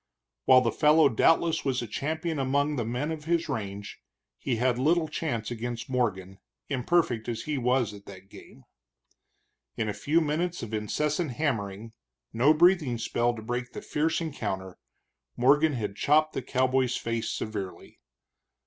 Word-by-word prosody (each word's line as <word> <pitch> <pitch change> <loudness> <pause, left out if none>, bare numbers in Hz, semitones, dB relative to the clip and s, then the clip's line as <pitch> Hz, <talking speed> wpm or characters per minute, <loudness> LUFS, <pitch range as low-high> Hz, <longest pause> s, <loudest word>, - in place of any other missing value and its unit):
While 130 -1 +7
the 115 -2 +1
fellow 150 +2 +5
doubtless 160 +7 +2
was 130 -3 -1
a - - -6
champion 160 +6 -3
among 140 +3 +1
the 120 - -1
men 125 +7 -2
of 155 -2 -6
his 170 0 0
range, 100 -2 -5 0.4
he 130 - -1
had 125 +1 +1
little 160 +4 +2
chance 135 -8 -3
against 120 +1 -5
Morgan, 95 -6 -1 0.3
imperfect 130 -4 0
as 115 -1 -3
he 150 -3 -2
was 125 -3 +1
at 100 -1 -13
that 95 -1 -12
game. 70 - -15 1.1
In 110 - -1
a 105 - -1
few 150 +10 +1
minutes 165 +2 -1
of 115 -1 -7
incessant 150 - -1
hammering, 115 -6 -3 0.4
no 125 +7 +4
breathing 155 -6 +4
spell 120 +1 0
to 110 - -8
break 120 +2 -4
the - - -6
fierce 160 +2 0
encounter, 95 - -4 0.6
Morgan 145 +5 +4
had 105 -5 -3
chopped 155 +6 +3
the - - -2
cowboy's 130 -1 +1
face 115 -1 -2
severely. 100 -4 -6
125 Hz, 155 wpm, -27 LUFS, 115-150 Hz, 1.1 s, While